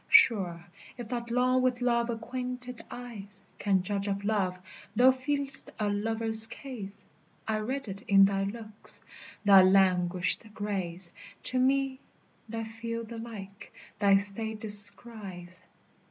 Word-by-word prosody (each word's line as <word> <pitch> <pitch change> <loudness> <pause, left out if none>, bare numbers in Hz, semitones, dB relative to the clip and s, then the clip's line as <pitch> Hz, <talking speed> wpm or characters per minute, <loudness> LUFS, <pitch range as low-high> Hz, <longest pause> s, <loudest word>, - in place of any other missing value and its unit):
Sure, 195 - +3 0.3
if 240 -3 -8
that 235 -1 -5
long 255 +2 +1
with 255 -1 0
love 235 -1 0
acquainted 250 +1 -6
eyes 205 -5 -10 0.2
Can 195 -3 0
judge 200 +1 -3
of 200 0 -3
love, 195 -4 -1 0.4
thou 250 +3 +6
feel'st 275 +1 +2
a 210 -1 -1
lover's 225 +1 +3
case; 225 -6 -9 0.4
I 220 -1 -1
read 260 +4 -5
it 195 0 -7
in 195 -1 +6
thy 195 0 -1
looks; 215 0 -6 0.4
thy 195 -1 +7
languished 185 +1 +2
grace 185 -4 0 0.3
To 255 - 0
me, 270 0 0 0.5
that 225 0 -5
feel 230 +1 -6
the 230 0 -9
like, 200 -4 -10 0.3
thy 200 -1 +4
state 210 +2 +1
descries. 205 -4 +4
220 Hz, 130 wpm, -28 LUFS, 195-245 Hz, 0.5 s, thy